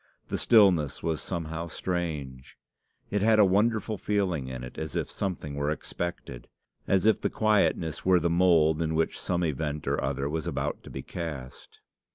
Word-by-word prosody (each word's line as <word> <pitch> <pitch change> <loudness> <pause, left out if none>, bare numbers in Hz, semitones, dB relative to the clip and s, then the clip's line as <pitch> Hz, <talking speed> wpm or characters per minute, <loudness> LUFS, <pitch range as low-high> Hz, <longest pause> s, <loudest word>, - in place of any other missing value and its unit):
The - - -1
stillness 95 - +4
was 80 -2 -1
somehow 85 -1 -4
strange. 80 -7 -4 0.5
It 105 - +1
had 110 +1 +4
a 105 - +7
wonderful 105 +2 +1
feeling 95 -10 0
in 65 -1 -6
it 60 - -8
as 80 -3 -5
if - - -2
something 90 -7 -4
were 70 +1 -1
expected 80 -4 -5 0.4
as 95 -1 +2
if 110 - +4
the - - 0
quietness 100 -7 +1
were 90 -1 +4
the 85 - +1
mould 85 -2 +4
in 80 -1 -1
which 80 0 0
some 90 -1 -1
event 75 -1 -2
or - - 0
other 70 - -1
was 80 +1 -3
about - - -2
to - - -9
be 65 - -6
cast. 75 -7 -7
85 Hz, 175 wpm, -28 LUFS, 75-95 Hz, 0.5 s, a